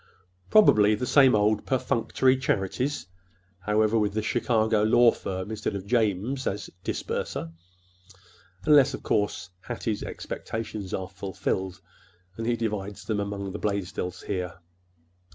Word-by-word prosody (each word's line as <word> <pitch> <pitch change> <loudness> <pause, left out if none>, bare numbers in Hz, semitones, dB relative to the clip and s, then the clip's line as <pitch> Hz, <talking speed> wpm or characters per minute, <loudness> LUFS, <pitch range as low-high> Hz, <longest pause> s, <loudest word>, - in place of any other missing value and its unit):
Probably 110 - +6
the 125 - -3
same 135 -2 +6
old 105 0 +2
perfunctory 130 0 +2
charities, 130 - -1 0.5
however, 105 +3 +2
with 105 -1 0
the 110 - 0
Chicago 110 -2 +1
law 115 +2 +6
firm 95 +2 -5
instead 110 -1 -3
of 95 -1 -5
'James' 115 +3 0
as 100 - -3
disburser—unless, 90 - -2
of - - -11
course, 105 -3 -1
Hattie's 115 -2 -3
expectations 110 -4 -5
are 95 -1 -3
fulfilled, 95 0 -3 0.6
and 115 +2 -4
he 120 - +2
divides 105 -3 -4
them 110 -2 -1
among 100 -1 -3
the 105 - -6
Blaisdells 100 -3 -3
here." 90 -4 -3
105 Hz, 120 wpm, -26 LUFS, 95-115 Hz, 0.6 s, Probably